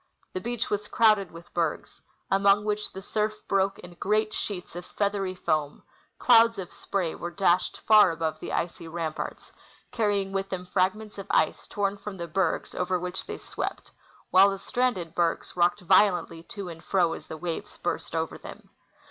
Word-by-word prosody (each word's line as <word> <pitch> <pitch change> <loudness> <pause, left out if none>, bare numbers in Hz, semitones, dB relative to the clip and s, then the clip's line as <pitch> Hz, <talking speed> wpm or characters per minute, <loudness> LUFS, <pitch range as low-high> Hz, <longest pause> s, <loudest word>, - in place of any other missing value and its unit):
The 185 - -3
beach 235 +2 -2
was 210 0 -1
crowded 215 -5 +4
with 170 +1 -13
bergs, 165 -3 -2 0.3
among 200 +1 +4
Avhich 210 0 -1
the 190 - -8
surf 215 +1 -1
broke 195 0 +2
in 175 0 -11
great 215 +4 0
sheets 180 -4 -4
of 175 - -5
feathery 200 -1 -1
foam; 155 -5 -1 0.3
clouds 230 -2 +6
of 185 -2 -5
sj^ray 180 -5 -2
Avere 175 0 -6
dashed 185 -2 +2
far 215 -1 +7
above 160 -1 -2
the - - -6
icy 170 -1 -2
ramparts, 160 -1 -5 0.4
carrying 205 -5 0
with 195 0 -2
them 180 -1 -4
fragments 200 +3 -1
of 195 - -7
ice - - +1
torn 200 -1 -1
from 200 -1 -7
the 170 -1 -5
bergs 175 +1 0
over 180 0 0
Avhich 180 +1 -5
they - - -5
swept; - - -5 0.4
Avhile 195 +2 +8
the 195 - -3
stranded 195 -7 -1
bergs 170 -1 0
rocked 180 +4 +2
violently 185 -2 +3
to 195 +3 -7
and 165 -2 -9
fro 180 -4 +2
as - - -9
the 160 - -6
Avaves 165 +1 -5
burst - - -3
over - - -2
them. - - -11
190 Hz, 175 wpm, -27 LUFS, 175-205 Hz, 0.4 s, Avhile